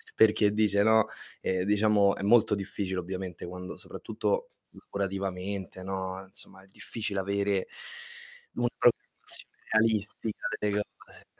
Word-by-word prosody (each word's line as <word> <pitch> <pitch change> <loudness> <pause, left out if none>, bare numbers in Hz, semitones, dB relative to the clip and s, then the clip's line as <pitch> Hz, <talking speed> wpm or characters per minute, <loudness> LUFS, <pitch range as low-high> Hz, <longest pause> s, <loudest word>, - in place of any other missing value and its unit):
Perché 105 -1 +5
dice, 105 -2 +3
no 110 0 +5 0.3
ehm, 95 -1 0
diciamo, 105 -1 +4
è - - -7
molto 105 0 +5
difficile 95 -1 -3
ovviamente 90 -1 -5
quando 90 +1 -7
soprattutto - - -2 0.2
lavorativamente, 95 -1 -4
no, 95 0 -3
insomma, 95 0 -10
è 95 - -19
difficile 105 +1 -3
avere 100 0 0 0.9
una 120 0 +1
programmazione 120 - +1
realistica 110 0 +1
delle 105 0 +1 0.2
cose. - - -17
100 Hz, 115 wpm, -29 LUFS, 95-105 Hz, 0.9 s, Perché